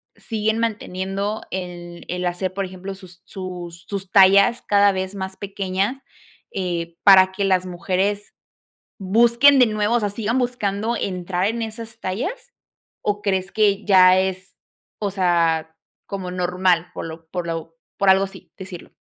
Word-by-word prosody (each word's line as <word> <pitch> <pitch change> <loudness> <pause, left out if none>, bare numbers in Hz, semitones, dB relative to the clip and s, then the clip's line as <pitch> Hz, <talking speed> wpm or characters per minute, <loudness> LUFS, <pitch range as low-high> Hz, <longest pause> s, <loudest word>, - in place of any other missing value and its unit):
siguen 220 0 -2
manteniendo 200 -1 -2
el 175 -2 -7
el 180 0 -3
hacer, 180 +1 -2
por 195 0 -2
ejemplo, 190 +1 -7
sus 185 -2 -14
sus 180 -2 -8
sus 195 -2 -5
tallas 200 +4 +6
cada 205 0 +4
vez 190 +1 -4
más 190 -1 -5
pequeñas, 195 +3 -2 0.5
eh, 170 -3 -3
para 190 -2 +7
que 195 +1 -2
las 185 -1 +2
mujeres 190 +3 -2 0.7
busquen 235 +8 +5
de 255 - +7
nuevo, 215 0 0
o - - +3
sea, 205 -2 -1
sigan 225 +3 -1
buscando 235 -3 -1
entrar 185 -2 -2
en 230 +1 -2
esas 225 0 -7
tallas?, 365 - -4 0.5
o, 205 0 -1
¿crees 190 -2 -1
que 210 -1 +2
ya 185 -2 +6
es, 190 0 -3 0.4
o 205 - -1
sea, 165 -4 +1 0.3
como 190 -2 -5
normal 180 -1 0
por - - -6
lo 165 0 -10
por 175 -1 -4
lo 165 0 -5 0.2
por 195 -1 +5
algo 190 +1 +4
así 195 - -13
decirlo? 185 -3 -9
190 Hz, 150 wpm, -22 LUFS, 180-205 Hz, 0.7 s, para